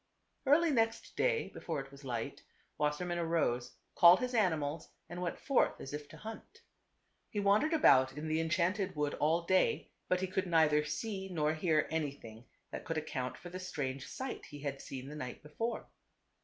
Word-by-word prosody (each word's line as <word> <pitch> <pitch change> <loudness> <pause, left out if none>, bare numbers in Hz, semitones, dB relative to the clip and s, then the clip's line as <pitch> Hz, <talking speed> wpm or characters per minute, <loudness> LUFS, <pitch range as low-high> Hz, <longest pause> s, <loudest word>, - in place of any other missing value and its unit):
Early 320 +4 +5
next 225 -3 0
day - - +1
before 160 -4 -4
it 135 0 -8
was 140 +1 -14
light, 120 -4 -4 0.4
Wasser 150 +3 0
mann 175 -1 -2
arose, 155 -8 0 0.2
called 175 +1 +8
his 250 0 -2
animals 160 -8 0 0.2
and 175 +1 -6
went 175 -2 -2
forth 275 - +2
as 135 - -7
if 150 0 -5
to - - -12
hunt. 225 - -10 0.7
He 210 - -2
wandered 205 +9 +3
about 135 - +5
in 155 +1 -4
the 155 +1 +1
enchanted 180 +4 0
wood 150 -1 0
all 165 +3 +2
day, 185 +2 +2 0.2
but 185 - +2
he - - +1
could 185 0 -1
neither 155 -3 +4
see 190 +4 -4
nor 155 -4 +1
hear 155 -1 +2
anything 140 -7 -4 0.3
that - - -5
could 165 - -3
account 130 -5 -3
for 175 - -10
the 185 - -5
strange 135 -7 -4
sight 260 -1 -5
he 145 -1 -10
had 140 -1 -4
seen 130 0 -7
the 145 - -7
night 125 -3 -6
before. 225 +11 -3
165 Hz, 185 wpm, -34 LUFS, 145-190 Hz, 0.7 s, called